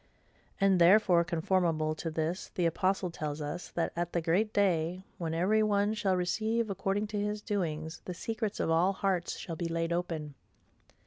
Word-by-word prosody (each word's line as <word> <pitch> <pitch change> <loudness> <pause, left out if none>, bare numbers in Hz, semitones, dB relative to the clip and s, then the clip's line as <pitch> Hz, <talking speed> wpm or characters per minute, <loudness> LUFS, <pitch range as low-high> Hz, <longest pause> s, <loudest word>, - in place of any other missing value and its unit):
And 195 -3 +4
therefore, 175 -1 +6
conformable 170 -2 +1
to 165 +1 -4
this, 160 +3 -2
the 180 - +1
apostle 185 +2 +1
tells 150 -2 -4
us, 150 +4 -5
that, 170 - 0
at 175 0 -2
the 170 - +1
great 185 +7 +1
day, 180 -3 +1 0.2
when 165 -2 -2
every 200 +6 +3
one 205 0 +2
shall 195 -3 +1
'receive 220 +5 0
according 195 +2 -1
to 205 - 0
his 210 +1 -1
doings, 160 -6 -3
the 180 - -5
secrets 220 +2 -3
of - - 0
all 175 +4 +3
hearts 190 -3 -1
shall 165 - -6
be 170 +1 -3
laid 165 0 -1
open. 165 -4 -3
180 Hz, 175 wpm, -31 LUFS, 165-200 Hz, 0.2 s, therefore